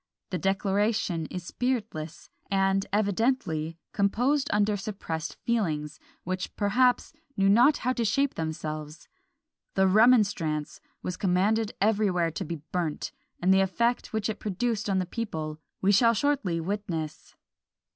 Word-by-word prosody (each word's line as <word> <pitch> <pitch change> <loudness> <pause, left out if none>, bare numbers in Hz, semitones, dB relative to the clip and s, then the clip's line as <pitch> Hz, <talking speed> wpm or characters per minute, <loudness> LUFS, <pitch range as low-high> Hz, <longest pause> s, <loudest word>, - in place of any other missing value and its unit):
The 180 - -1
declaration 195 -3 0
is 180 - -6
spiritless, 210 -11 -3 0.2
and 195 0 +2
evidently 200 -6 0
composed 245 +8 +1
under 210 0 +2
suppressed 195 -6 -4
feelings, 165 -10 -1 0.2
which, 185 +1 -4
perhaps, 245 +7 +2 0.2
knew 195 0 +3
not 245 +9 +6
how 255 - 0
to 240 - -1
shape 275 +6 +1
themselves. 155 -1 -5 0.7
The 190 - +4
"Remonstrance" 200 -8 +3 0.2
was 180 0 -3
commanded 205 +4 +1
everywhere 200 -5 +2
to 190 +5 -4
be 165 -3 -6
burnt; 170 -4 -2 0.3
and 185 +2 +4
the 190 - +5
effect 235 +6 0
which 220 -2 -1
it 215 -2 -4
produced 215 +1 -1
on 195 - +2
the 185 - +1
people 160 -7 -4 0.2
we 195 - +5
shall 230 +3 +5
shortly 230 -10 +1
witness. 165 -4 -4
195 Hz, 130 wpm, -27 LUFS, 170-220 Hz, 0.7 s, not